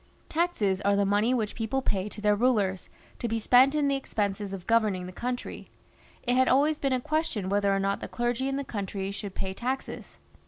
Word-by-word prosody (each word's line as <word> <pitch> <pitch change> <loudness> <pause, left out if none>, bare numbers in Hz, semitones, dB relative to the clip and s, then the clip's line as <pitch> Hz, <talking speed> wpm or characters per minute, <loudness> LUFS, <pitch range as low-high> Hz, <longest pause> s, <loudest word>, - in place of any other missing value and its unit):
Taxes 230 - 0
are 200 0 +2
the 200 0 +2
money 205 +4 +2
which 225 -5 0
people 235 +4 -2
pay 195 -2 -1
to 210 - -9
their 210 0 +3
rulers, 205 -5 +1 0.3
to 240 - -2
be 225 0 -1
spent 255 +5 +5
in 295 -2 +2
the 280 - +2
expenses 205 -6 -2
of 190 -2 -7
governing 215 -5 +2
the 180 - -7
country. 245 +6 -5 0.5
It 245 -1 +1
had 260 0 +4
always 295 +4 +3
been 275 - 0
a 255 - +1
question 305 - -1
whether 200 0 +2
or 195 - +2
not 195 0 0
the - - -6
clergy 240 +2 -1
in 270 - -1
the 280 - -2
country 195 -4 -4
should 200 -1 -7
pay 190 -1 -3
taxes. 255 +6 -5
220 Hz, 210 wpm, -28 LUFS, 200-260 Hz, 0.5 s, spent